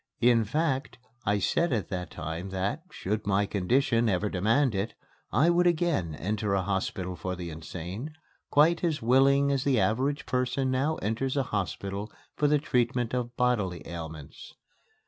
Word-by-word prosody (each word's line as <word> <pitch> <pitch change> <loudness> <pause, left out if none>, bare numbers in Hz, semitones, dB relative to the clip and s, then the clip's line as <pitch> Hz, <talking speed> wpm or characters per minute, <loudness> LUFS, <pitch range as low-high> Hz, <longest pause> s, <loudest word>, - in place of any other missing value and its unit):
In 120 -2 +5
fact, 135 0 -1 0.3
I 105 0 +3
said 170 - +1
at 110 -7 -1
that 90 -3 -4
time 80 +5 -5
that, 95 +10 -2
should 105 - -3
my 100 0 +3
condition 115 +4 +2
ever 100 +2 +1
demand 110 +8 +2
it, 100 +3 -2 0.4
I 155 +9 +4
would 175 +1 +3
again 160 - +1
enter 105 +3 -1
a 95 - +1
hospital 95 -1 -2
for 90 +2 -4
the 85 -2 -6
insane, 90 - -6 0.3
quite 165 +4 +4
as 160 -7 0
willingly 140 +3 +4
as 135 -2 0
the 135 -5 +2
average 130 +9 +1
person 125 +1 0
now 140 +5 +1
enters 130 +6 -1
a 135 - +3
hospital 100 +1 -3 0.2
for 150 - +2
the 150 +1 +4
treatment 125 -4 0
of 120 -1 -3
bodily 105 -9 0
ailments. 80 -3 -8
115 Hz, 160 wpm, -28 LUFS, 95-135 Hz, 0.4 s, In